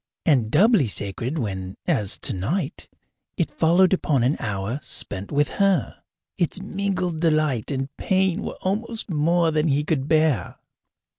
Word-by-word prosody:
And 130 Hz, -9 st, +3 dB
doubly 190 Hz, -, +4 dB
sacred 110 Hz, -, -3 dB
when, 95 Hz, -7 st, -4 dB
as 100 Hz, -3 st, 0 dB
tonight, 135 Hz, -, -3 dB, 0.5 s
it -, -, 0 dB
followed 180 Hz, +4 st, +3 dB
upon 145 Hz, -9 st, +1 dB
an 130 Hz, +5 st, +2 dB
hour 105 Hz, +4 st, -3 dB
spent 100 Hz, -5 st, -3 dB
with 145 Hz, 0 st, +2 dB
her? 195 Hz, -, +1 dB, 0.4 s
Its 175 Hz, +2 st, 0 dB
mingled 190 Hz, -4 st, -2 dB
delight 155 Hz, -8 st, +1 dB
and 135 Hz, 0 st, -3 dB
pain 190 Hz, 0 st, +1 dB
were -, -, -5 dB
almost 215 Hz, +2 st, -2 dB
more 165 Hz, +2 st, +2 dB
than 155 Hz, +1 st, +1 dB
he 145 Hz, 0 st, +2 dB
could 145 Hz, -3 st, -1 dB
bear. 155 Hz, -, +2 dB
155 Hz, 140 wpm, -23 LUFS, 120-180 Hz, 0.5 s, doubly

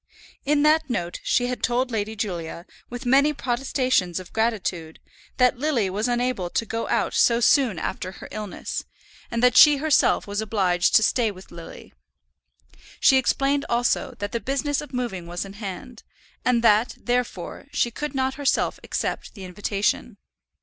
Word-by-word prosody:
In 290 Hz, +1 st, +2 dB
that 310 Hz, 0 st, +3 dB
note 175 Hz, -7 st, -3 dB
she 245 Hz, -, +1 dB
had 250 Hz, 0 st, -3 dB
told 250 Hz, +1 st, 0 dB
Lady 220 Hz, 0 st, -2 dB
Julia, 175 Hz, -5 st, -4 dB, 0.2 s
with 245 Hz, +1 st, -7 dB
many 280 Hz, +4 st, +4 dB
protestations 255 Hz, -, 0 dB
of 185 Hz, -, -12 dB
gratitude, 195 Hz, -8 st, -2 dB, 0.4 s
that 250 Hz, -1 st, +3 dB
Lily 255 Hz, -10 st, 0 dB
was 210 Hz, +5 st, -1 dB
unable 245 Hz, -6 st, -1 dB
to 230 Hz, -, -1 dB
go 225 Hz, +2 st, -3 dB
out -, -, 0 dB
so 235 Hz, -1 st, +4 dB
soon 240 Hz, -, +3 dB
after 185 Hz, +2 st, -4 dB
her -, -, -10 dB
illness, 210 Hz, -2 st, -5 dB, 0.5 s
and 235 Hz, 0 st, -2 dB
that 250 Hz, -1 st, +5 dB
she 295 Hz, +1 st, +8 dB
herself 305 Hz, +1 st, +2 dB
was 205 Hz, +1 st, -3 dB
obliged 190 Hz, -5 st, +1 dB
to 220 Hz, -, +6 dB
stay 230 Hz, +1 st, +2 dB
with 190 Hz, -2 st, -12 dB
Lily. 170 Hz, -1 st, -11 dB, 1.1 s
She 265 Hz, -, +5 dB
explained 275 Hz, +2 st, +1 dB
also, 245 Hz, +1 st, 0 dB
that 205 Hz, -1 st, -4 dB
the 235 Hz, -, -2 dB
business 275 Hz, +5 st, -1 dB
of 295 Hz, -, -10 dB
moving 235 Hz, -9 st, -4 dB
was 175 Hz, +3 st, -4 dB
in 195 Hz, -, -10 dB
hand, 210 Hz, +4 st, -8 dB, 0.4 s
and 240 Hz, -2 st, +2 dB
that, 220 Hz, +1 st, +3 dB
therefore, 245 Hz, 0 st, -3 dB
she 240 Hz, -, 0 dB
could 295 Hz, +4 st, -5 dB
not 265 Hz, 0 st, 0 dB
herself 285 Hz, 0 st, 0 dB
accept -, -, -4 dB
the 195 Hz, -, -9 dB
invitation. 200 Hz, +3 st, -2 dB
235 Hz, 165 wpm, -24 LUFS, 200-260 Hz, 1.1 s, she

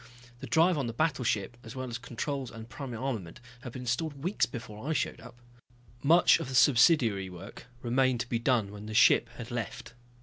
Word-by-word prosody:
The -, -, -7 dB
drive 165 Hz, 0 st, +3 dB
on 135 Hz, -, -1 dB
the 115 Hz, -, -4 dB
battleship, 120 Hz, -7 st, -1 dB
as 115 Hz, +3 st, -10 dB
well 130 Hz, 0 st, -4 dB
as 120 Hz, -1 st, -5 dB
controls 130 Hz, +2 st, -4 dB
and 115 Hz, -1 st, -10 dB
primary 125 Hz, -1 st, -7 dB
armament 110 Hz, -11 st, -4 dB, 0.2 s
had 125 Hz, -1 st, -8 dB
been 125 Hz, -, -7 dB
installed 140 Hz, +3 st, -2 dB
weeks 185 Hz, +4 st, +1 dB
before 120 Hz, +1 st, -7 dB
I -, -, +2 dB
showed -, -, -2 dB
up. 120 Hz, +1 st, -12 dB, 0.7 s
Much 170 Hz, +5 st, +5 dB
of -, -, -5 dB
the 130 Hz, -, -4 dB
subsidiary 120 Hz, -, +4 dB
work 95 Hz, +7 st, -11 dB, 0.2 s
remained 125 Hz, 0 st, +2 dB
to 120 Hz, -, -5 dB
be 120 Hz, -1 st, -1 dB
done 115 Hz, -4 st, +1 dB
when 105 Hz, +1 st, -9 dB
the 110 Hz, -, -6 dB
ship 120 Hz, +1 st, +5 dB
had 120 Hz, +1 st, -8 dB
left. 120 Hz, 0 st, -5 dB
120 Hz, 200 wpm, -29 LUFS, 115-135 Hz, 0.7 s, Much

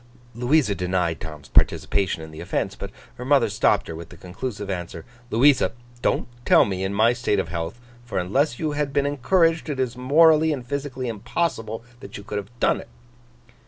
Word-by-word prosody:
Louisa 125 Hz, 0 st, +2 dB
denied 90 Hz, -3 st, -1 dB
Tom's 75 Hz, -3 st, -8 dB
participation 95 Hz, -5 st, +2 dB
in 80 Hz, -, -10 dB
the 80 Hz, -, -10 dB
offence; -, -, -2 dB
but -, -, -7 dB, 0.3 s
her -, -, -4 dB
mother 140 Hz, +2 st, +3 dB
stopped -, -, +2 dB
her 80 Hz, -, -6 dB
with 85 Hz, 0 st, -9 dB
the -, -, -13 dB
conclusive 100 Hz, +3 st, -6 dB
answer, 85 Hz, -3 st, -5 dB, 0.2 s
'Louisa, 130 Hz, +4 st, +4 dB, 0.3 s
don't -, -, 0 dB, 0.2 s
tell -, -, +6 dB
me, 95 Hz, -2 st, -3 dB
in 95 Hz, -, -1 dB
my 110 Hz, +4 st, +4 dB
state 120 Hz, -4 st, 0 dB
of 95 Hz, -4 st, -1 dB
health; 85 Hz, +6 st, -4 dB, 0.2 s
for 120 Hz, -, -5 dB
unless 120 Hz, -, +1 dB
you 155 Hz, -2 st, -1 dB
had 145 Hz, -1 st, -2 dB
been 140 Hz, 0 st, +2 dB
encouraged, 165 Hz, +4 st, +2 dB
it 140 Hz, -3 st, -3 dB
is 125 Hz, -2 st, -1 dB
morally 155 Hz, +5 st, +5 dB
and 130 Hz, -5 st, -3 dB
physically 135 Hz, -1 st, -4 dB
impossible 115 Hz, 0 st, -2 dB, 0.2 s
that -, -, -9 dB
you 100 Hz, -, -9 dB
could 105 Hz, 0 st, -3 dB
have 100 Hz, 0 st, -9 dB
done -, -, +2 dB
it. -, -, -15 dB
120 Hz, 190 wpm, -23 LUFS, 95-140 Hz, 0.3 s, tell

